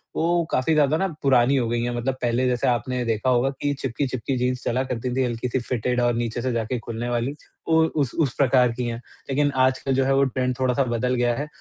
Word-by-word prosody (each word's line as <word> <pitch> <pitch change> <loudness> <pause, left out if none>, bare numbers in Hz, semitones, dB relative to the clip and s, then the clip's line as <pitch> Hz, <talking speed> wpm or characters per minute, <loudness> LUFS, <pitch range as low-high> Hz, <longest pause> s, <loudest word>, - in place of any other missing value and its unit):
वो 170 +1 +1
काफ़ी 130 +5 +1
ज़्यादा 150 0 +3
ना 195 - +1
पुरानी 135 -1 +4
हो 120 -3 +1
गई 120 0 0
है। 120 0 -2
मतलब 120 +3 -1
पहले 120 +1 +1
जैसे 125 -1 0
आपने 125 +1 0
देखा 115 +2 0
होगा 125 +1 +3
कि 145 0 +1
चिपकी-चिपकी 130 0 -2
जीन्स 125 0 -1
चला 125 +2 0
करती 125 -1 -3
थी, 130 - +2
हल्की-सी 120 +1 -2
फिटेड 125 0 -1
और 120 0 +2
नीचे 120 0 -2
से 130 +1 -1
जाके 115 +1 -2
खुलने 115 +1 -5
वाली, 120 +2 -1 0.4
वो 160 0 +4
उस 145 -6 -1
उस 140 -6 +2
प्रकार 125 -3 +4
की 120 +2 -4
है, 115 - -3 0.3
लेकिन 145 +1 +1
आजकल 130 +1 0
जो 135 0 +2
है 135 - +2
वो 135 - +4
ट्रेंड 130 -1 -1
थोड़ा-सा 130 +1 +2
बदल 125 +1 -1
गया 120 -1 +1
है, 145 +5 -4
125 Hz, 230 wpm, -23 LUFS, 120-135 Hz, 0.4 s, पुरानी